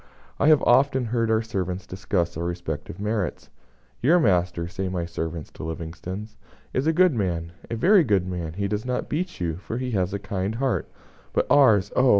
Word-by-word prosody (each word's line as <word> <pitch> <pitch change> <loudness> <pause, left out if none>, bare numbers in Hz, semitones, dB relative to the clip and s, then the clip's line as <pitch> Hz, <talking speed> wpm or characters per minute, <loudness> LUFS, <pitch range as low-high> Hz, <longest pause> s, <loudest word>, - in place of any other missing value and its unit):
I - - +3
have 155 -3 +6
often 130 +1 +4
heard 115 0 0
our 110 0 +2
servants 95 -4 -3
discuss 90 -2 -2
our 85 - -3
respective 85 -2 -4
merits. 105 -2 -2 0.5
"Your 165 +8 +5
master," 90 - +1
say 95 +1 -3
my 90 -2 -2
servants 80 -1 -5
to - - -9
Livingstone's, 90 +6 -6 0.4
"is 130 +4 0
a - - +5
good 180 0 +4
man 85 -7 -2 0.2
a 115 - -2
very 185 - +5
good 100 - +2
man; 85 -3 -4
he 100 +3 -1
does 105 +1 -2
not 125 0 -2
beat 175 +4 -3
you, 85 -2 -2
for 105 +4 -5
he 125 0 -3
has 95 -3 0
a 100 - -1
kind 100 +1 -3
heart; 130 +1 -1 0.4
but - - +2
ours 110 -9 +5
oh! 130 0 +4
100 Hz, 190 wpm, -25 LUFS, 90-125 Hz, 0.5 s, have